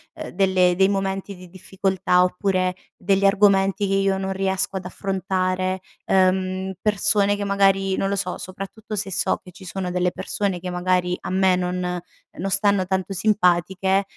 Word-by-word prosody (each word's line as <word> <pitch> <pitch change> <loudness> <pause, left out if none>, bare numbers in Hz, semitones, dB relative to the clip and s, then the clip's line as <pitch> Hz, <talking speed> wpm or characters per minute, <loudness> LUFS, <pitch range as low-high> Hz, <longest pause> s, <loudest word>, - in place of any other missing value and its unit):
uhm, - - -7
delle 185 -1 +3
dei 190 +1 +4
momenti 195 0 -2
di 180 0 -12
difficoltà, 190 -1 0
oppure 185 -1 0 0.2
degli 195 +1 +1
argomenti 195 0 +3
che 195 - -1
io 195 0 +2
non 190 0 -3
riesco 190 0 -1
ad 190 - -3
affrontare, 185 0 -2 0.3
uhm, 185 0 +1
persone 205 -1 +2
che 205 - -3
magari, 195 -1 +2
non 195 - -1
lo 200 - 0
so, 185 -2 -2
soprattutto, 195 +3 -7
se 195 0 -2
so - - +1
che 180 - -14
ci 190 - -15
sono 185 0 -4
delle 180 0 0
persone 195 -4 -2
che 180 +1 -6
magari, 180 0 0
a - - -6
me 190 0 +3
non 180 0 -2 0.4
non 195 +3 -3
stanno 200 -1 +2
tanto 190 +1 -2
simpatiche, 190 -1 +2
190 Hz, 165 wpm, -22 LUFS, 185-195 Hz, 0.4 s, dei